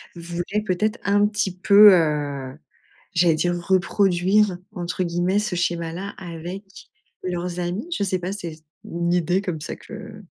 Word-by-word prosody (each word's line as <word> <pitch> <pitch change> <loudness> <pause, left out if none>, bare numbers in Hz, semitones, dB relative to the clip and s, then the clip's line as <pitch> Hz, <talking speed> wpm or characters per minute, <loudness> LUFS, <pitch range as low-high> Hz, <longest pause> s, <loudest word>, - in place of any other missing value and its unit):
voulaient, 175 +4 -3
peut-être, 210 +4 0
un 205 +1 +3
petit 205 -3 -2
peu, 205 +1 +8
heu, 145 -5 -1 0.6
j'allais 170 -1 +4
dire 175 +2 0
«reproduire» 190 +1 +3 0.2
entre 180 0 -3
guillemets 175 +3 +1
ce 210 -4 -2
schéma-là 175 +2 -2
avec 175 +2 -7 0.6
leurs 180 -1 -3
amis. 180 - -3
Je - - 0
sais 185 -2 0
pas, 180 +1 -4
c'est 170 -6 -6 0.3
une 170 0 -2
idée 180 +2 +1
comme 175 -5 -4
ça - - -5
que 215 -1 -10
180 Hz, 145 wpm, -23 LUFS, 170-200 Hz, 0.6 s, peu